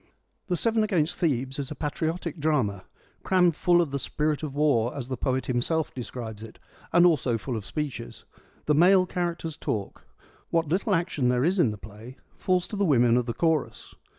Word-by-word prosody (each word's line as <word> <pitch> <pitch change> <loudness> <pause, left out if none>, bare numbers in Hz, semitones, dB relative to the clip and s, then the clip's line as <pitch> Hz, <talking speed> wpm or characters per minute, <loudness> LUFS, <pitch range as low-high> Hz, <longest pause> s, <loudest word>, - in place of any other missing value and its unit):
The 180 -2 0
Seven 225 +1 +2
against 175 -6 0
Thebes 135 -5 0
is 140 - -4
a 150 - -6
patriotic 160 +3 -3
drama, 125 -11 0 0.2
' - - -35
crammed 180 -3 +3
full 175 +1 +3
of 160 -5 -2
the 140 - -2
spirit 150 +2 -1
of 145 -3 -5
war,' 140 -5 +1
as 130 -2 -6
the 130 - -2
poet 130 +2 -1
himself 140 +6 0
describes 115 -3 -7
it, 110 -1 -10 0.3
and 175 +1 +5
also 135 -8 +2
full 120 +2 -5
of 110 -1 -5
speeches. 140 -5 -5 0.4
The 150 - +3
male 185 +4 +5
characters 170 -3 -3
talk; 100 -3 -4 0.4
what 165 -1 +1
little 185 +5 +1
action 165 -7 0
there 125 +2 +2
is 185 +3 +1
in 140 - +4
the 105 - -5
play 110 +5 -12 0.2
falls 180 -1 0
to - - -5
the 200 - 0
women 120 -8 +4
of 125 0 +1
the 115 - -2
chorus. 160 -4 -1
150 Hz, 195 wpm, -26 LUFS, 125-175 Hz, 0.4 s, and